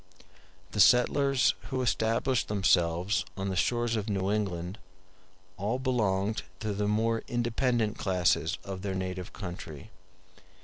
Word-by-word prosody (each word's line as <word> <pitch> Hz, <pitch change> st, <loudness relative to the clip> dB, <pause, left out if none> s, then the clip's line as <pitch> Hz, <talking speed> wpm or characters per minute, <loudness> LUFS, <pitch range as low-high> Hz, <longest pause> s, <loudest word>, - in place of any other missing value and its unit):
The 105 Hz, -, -4 dB
settlers 130 Hz, +5 st, +5 dB, 0.2 s
who 130 Hz, -1 st, -1 dB
established 115 Hz, +2 st, +1 dB
themselves 95 Hz, -1 st, +2 dB
on 95 Hz, 0 st, -2 dB
the 95 Hz, -, -2 dB
shores 120 Hz, +6 st, +1 dB
of 110 Hz, 0 st, -3 dB
New 95 Hz, -1 st, 0 dB
England 95 Hz, -2 st, -2 dB, 0.8 s
all 105 Hz, +6 st, -1 dB
belonged 110 Hz, -5 st, 0 dB, 0.2 s
to 110 Hz, -2 st, -2 dB
the 105 Hz, +1 st, -1 dB
more 115 Hz, +2 st, +1 dB
independent 120 Hz, -2 st, 0 dB
classes 90 Hz, -3 st, +1 dB
of 95 Hz, -1 st, -6 dB
their 95 Hz, -1 st, -3 dB
native 90 Hz, -1 st, -4 dB
country. 90 Hz, -1 st, -8 dB
105 Hz, 125 wpm, -29 LUFS, 95-115 Hz, 0.8 s, settlers